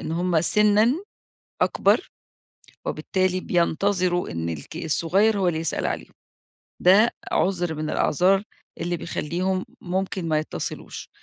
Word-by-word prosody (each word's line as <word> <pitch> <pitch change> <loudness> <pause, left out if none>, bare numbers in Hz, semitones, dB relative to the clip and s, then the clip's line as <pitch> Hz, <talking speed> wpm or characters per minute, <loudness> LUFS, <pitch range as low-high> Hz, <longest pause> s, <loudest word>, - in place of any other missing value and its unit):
إن 160 - -4
هم 175 -1 +1
سنًا 210 - +4 0.7
أكبر - - +2 0.8
وبالتالي 185 - 0
بينتظروا 180 +1 +1
إن 85 0 -3
الك 80 - -6
الصغير 190 +7 +2
هو 185 -2 +2
اللي 160 - 0
يسأل 165 - -1
عليهم. - - -4 0.7
ده 200 +6 +6 0.2
عذر 175 -3 +1
من 155 0 -3
الأعذار 190 +7 +3 0.4
اللي 175 0 -1
بيخليهم 185 +4 -2 0.2
ممكن 185 -1 -2
ما 155 -1 +2
يتصلوش. 155 - -6
180 Hz, 120 wpm, -24 LUFS, 165-195 Hz, 0.8 s, ده